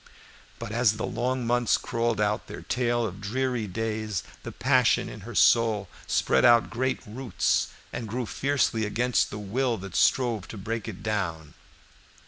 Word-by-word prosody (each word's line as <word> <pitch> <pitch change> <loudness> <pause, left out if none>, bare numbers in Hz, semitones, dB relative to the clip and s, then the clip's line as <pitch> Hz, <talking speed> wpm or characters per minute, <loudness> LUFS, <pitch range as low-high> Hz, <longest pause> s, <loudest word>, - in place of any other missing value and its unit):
But - - -6
as 115 -1 +3
the 110 - -3
long 125 0 -1
months 120 0 +2
crawled 115 -2 -1
out 105 0 0
their - - -8
tale 120 -2 0
of 100 -1 -6
dreary 125 +1 -1
days, 110 -1 -3 0.2
the - - -7
passion - - +3
in - - -8
her - - -9
soul 110 -5 +4 0.2
spread 65 - +2
out 120 -1 +5
great 130 +3 -1
roots 115 0 0 0.3
and 115 - -4
grew 120 +4 -3
fiercely 135 -3 0
against 120 +3 +1
the 105 - -6
will 115 +4 -1
that 95 -2 -8
strove 120 -6 +2
to 110 - -8
break 110 +3 -4
it 105 -5 -7
down. 90 -8 -2
115 Hz, 160 wpm, -27 LUFS, 105-120 Hz, 0.3 s, out